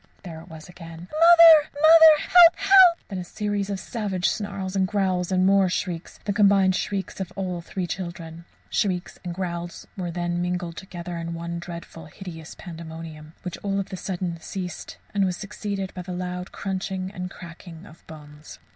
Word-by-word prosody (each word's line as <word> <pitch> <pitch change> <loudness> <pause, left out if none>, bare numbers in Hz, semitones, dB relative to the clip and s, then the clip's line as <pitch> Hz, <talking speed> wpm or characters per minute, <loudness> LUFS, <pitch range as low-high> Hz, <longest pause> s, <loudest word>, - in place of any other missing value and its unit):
There 165 -4 -8
it 170 - -15
was 160 -2 -11
again, 170 -1 -11
"Mother! 330 -1 +7
Mother! 315 0 +8
Help! 350 -2 +7
Help!" 380 -3 +6
Then 190 -3 -4
a - - -4
series 205 +1 -3
of 200 -1 -3
savage 190 -2 -2
snarls 200 -2 -3
and 190 -1 +2
growls 185 -3 -1
and 185 0 +2
more 195 -1 +4
shrieks 175 -2 -4
the 205 - -1
combined 195 -2 +4
shrieks 195 0 -3
of 190 - -5
all 185 -3 -3
three 180 +2 -4
children. 170 -2 -7 0.3
Shrieks 185 -3 -1
and 180 - -5
growls 175 -2 -5
were 180 -3 -4
then 175 0 -2
mingled 175 -1 -3
together 175 -2 -7
in 170 0 -5
one 170 0 -5
dreadful, 170 -2 -9
hideous 165 -2 -10
pandemonium, 160 -2 -9
which 180 - -6
all 200 -1 -2
of 195 0 -5
a - - -1
sudden 180 -2 -4
ceased, 180 0 -7 0.2
and 200 -1 +1
was 180 -2 -1
succeeded 200 -1 -5
by 180 - -6
the 180 0 -7
loud 180 0 -5
crunching 190 -1 -4
and 180 -2 -6
cracking 170 0 -12
of 165 -4 -16
bones. 150 -1 -12
185 Hz, 175 wpm, -24 LUFS, 170-200 Hz, 0.3 s, Mother